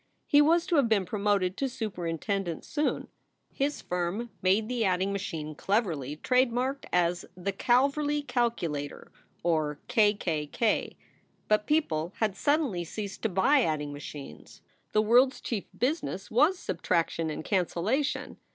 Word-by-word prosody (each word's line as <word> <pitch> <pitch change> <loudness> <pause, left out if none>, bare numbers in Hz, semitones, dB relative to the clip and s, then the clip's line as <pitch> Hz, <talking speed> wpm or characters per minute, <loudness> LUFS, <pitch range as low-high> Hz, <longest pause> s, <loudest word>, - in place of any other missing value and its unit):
He 290 - +5
was 330 +3 +4
to 335 - +1
have 265 -5 +3
been 205 -4 +3
promoted 200 -1 0
to 275 - 0
superin 185 -10 -3
tendent 195 -5 -2
soon. 300 0 -1 0.5
His 285 +2 -1
firm 180 +7 -2
made 195 +4 +3
the 245 -1 -1
adding 190 0 +1
machine 160 -6 -4
cleverly 160 - -1
trade 250 +8 +2
marked 260 +3 -2
as 175 0 +1
the 190 +2 -2
Kalverly 280 +7 +2
Kalkulator, 170 - -2 0.3
or 155 -3 0
"K 215 -4 +4
K 155 -6 -2
K." 220 +8 0 0.5
But 215 0 +2
people 175 - 0
had 215 -4 0
suddenly 275 - +1
ceased 200 +4 -6
to 225 - 0
buy 235 +10 +4
adding 150 -7 -1
machines. 145 - -10 0.3
The 215 - +3
world 250 +4 +5
s - - -12
chief 220 -5 -3
business 255 - -2
was 300 +11 +4
subtraction 165 - -1
and 155 +1 -5
cancellation. 200 - 0
205 Hz, 145 wpm, -28 LUFS, 170-250 Hz, 0.5 s, He